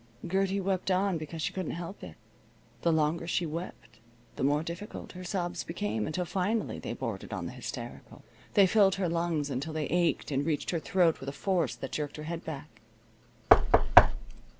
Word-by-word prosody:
Gertie 195 +2 +1
wept 190 -1 -1
on 185 -2 +2
because 155 +1 -5
she - - -1
couldn't 185 -4 -3
help 175 +3 -7
it. - - -8 0.7
The 170 - +3
longer 160 +1 +1
she 175 0 0
wept 160 -8 -7 0.4
the - - -6
more 145 +3 +2
difficult 170 +5 -7
her 185 0 -9
sobs 180 -2 -2
became, 110 -9 -2
until 180 +3 -2
finally 200 +6 -1
they - - -4
bordered - - -5
on - - -3
the - - -5
hysterical. - - -8 0.3
They 200 -2 +8
filled 195 0 +4
her 195 -2 0
lungs 165 -3 0
until 140 +5 -3
they 155 -1 -1
ached 170 -2 +1
and 140 0 +1
reached 155 -1 -1
her 170 - 0
throat 175 -1 +2
with 135 - -5
a - - -3
force 170 0 0
that 135 - -6
jerked 150 -1 -3
her 150 - -6
head 165 +1 -4
back. 140 -7 -8
170 Hz, 180 wpm, -30 LUFS, 150-185 Hz, 0.7 s, They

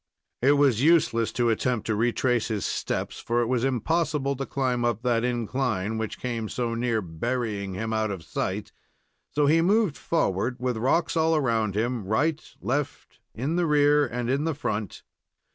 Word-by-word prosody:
It 135 +4 +5
was 140 -5 +3
useless 145 -8 +3
to 120 -2 +2
attempt 120 0 -1
to 110 - 0
retrace 120 +1 +1
his 105 -4 -2
steps, - - -3
for 120 +1 0
it - - -1
was 120 0 0
impossible 140 +2 0
to 135 - -4
climb 125 -3 -1
up 120 -1 0
that 120 -2 +1
incline, 120 -3 -1
which 110 - -4
came 115 -3 -3
so 120 -2 -2
near 115 -2 0
burying 100 +2 -3
him 110 +3 -3
out 110 -1 0
of 95 -5 -5
sight, 95 +5 -3 0.6
so 145 0 +1
he 160 +3 +4
moved 195 - +2
forward, 125 - 0
with 125 -2 -1
rocks 135 +10 +1
all 160 0 +3
around 115 -8 +1
him 120 +1 -1
right, 145 +11 0 0.2
left, 140 +3 -3 0.2
in 140 +9 -1
the 175 -1 +2
rear, 145 0 +4
and 120 0 -3
in 135 +4 +1
the 160 -2 -1
front. 110 -7 -4
125 Hz, 175 wpm, -26 LUFS, 110-145 Hz, 0.6 s, It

